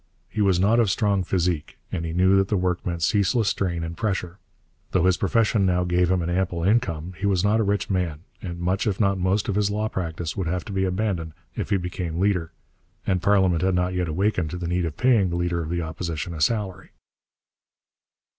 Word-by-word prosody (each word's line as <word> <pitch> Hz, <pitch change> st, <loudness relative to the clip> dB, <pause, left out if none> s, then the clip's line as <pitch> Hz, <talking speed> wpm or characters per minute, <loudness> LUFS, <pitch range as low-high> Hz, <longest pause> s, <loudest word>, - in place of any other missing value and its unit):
He 105 Hz, -, -3 dB
was 95 Hz, -3 st, +3 dB
not 105 Hz, +5 st, +4 dB
of 115 Hz, -4 st, +3 dB
strong 100 Hz, 0 st, +1 dB
physique, 90 Hz, -4 st, -1 dB
and 85 Hz, -, -2 dB
he 80 Hz, -, -3 dB
knew 95 Hz, +3 st, +4 dB
that 95 Hz, 0 st, +3 dB
the 105 Hz, -, +1 dB
work 90 Hz, -1 st, -1 dB
meant 85 Hz, -2 st, -3 dB
ceaseless 105 Hz, +3 st, +2 dB
strain 85 Hz, -4 st, -1 dB
and 85 Hz, 0 st, -5 dB
pressure. 95 Hz, -4 st, -2 dB, 0.5 s
Though 95 Hz, -, +3 dB
his 95 Hz, -1 st, +4 dB
profession 105 Hz, +1 st, +2 dB
now 90 Hz, -1 st, +2 dB
gave 90 Hz, 0 st, +2 dB
him 90 Hz, -2 st, +1 dB
an 85 Hz, -, -2 dB
ample 90 Hz, -2 st, -1 dB
income, 90 Hz, -5 st, +1 dB
he 100 Hz, -, 0 dB
was 95 Hz, -2 st, +2 dB
not 105 Hz, +2 st, +3 dB
a -, -, +3 dB
rich 100 Hz, 0 st, 0 dB
man, 90 Hz, -6 st, -1 dB, 0.2 s
and 85 Hz, -2 st, -6 dB
much 95 Hz, +6 st, 0 dB
if 100 Hz, -3 st, -1 dB
not 100 Hz, -3 st, +2 dB
most 95 Hz, +3 st, +1 dB
of 100 Hz, -, 0 dB
his 105 Hz, 0 st, +1 dB
law 105 Hz, +1 st, -1 dB
practice 85 Hz, -3 st, -4 dB
would 95 Hz, -4 st, -2 dB
have 90 Hz, +1 st, -2 dB
to -, -, -7 dB
be 95 Hz, 0 st, +1 dB
abandoned 90 Hz, -4 st, -2 dB, 0.2 s
if -, -, -3 dB
he 100 Hz, -, +3 dB
became 90 Hz, -2 st, -4 dB
leader; 90 Hz, -4 st, +1 dB, 0.5 s
and 95 Hz, -2 st, +1 dB
parliament 95 Hz, -3 st, +3 dB
had 95 Hz, 0 st, +2 dB
not 90 Hz, +1 st, 0 dB
yet 90 Hz, -1 st, -1 dB
awakened 90 Hz, 0 st, 0 dB
to 90 Hz, -, -5 dB
the 90 Hz, -1 st, -4 dB
need 90 Hz, 0 st, 0 dB
of 80 Hz, -2 st, -5 dB
paying 115 Hz, -7 st, +3 dB
the 85 Hz, -, -2 dB
leader 85 Hz, -1 st, 0 dB
of 80 Hz, -, -5 dB
the 85 Hz, 0 st, -1 dB
Opposition 80 Hz, +1 st, -4 dB
a 80 Hz, -, -6 dB
salary. 95 Hz, 0 st, -1 dB
90 Hz, 220 wpm, -24 LUFS, 85-100 Hz, 0.5 s, not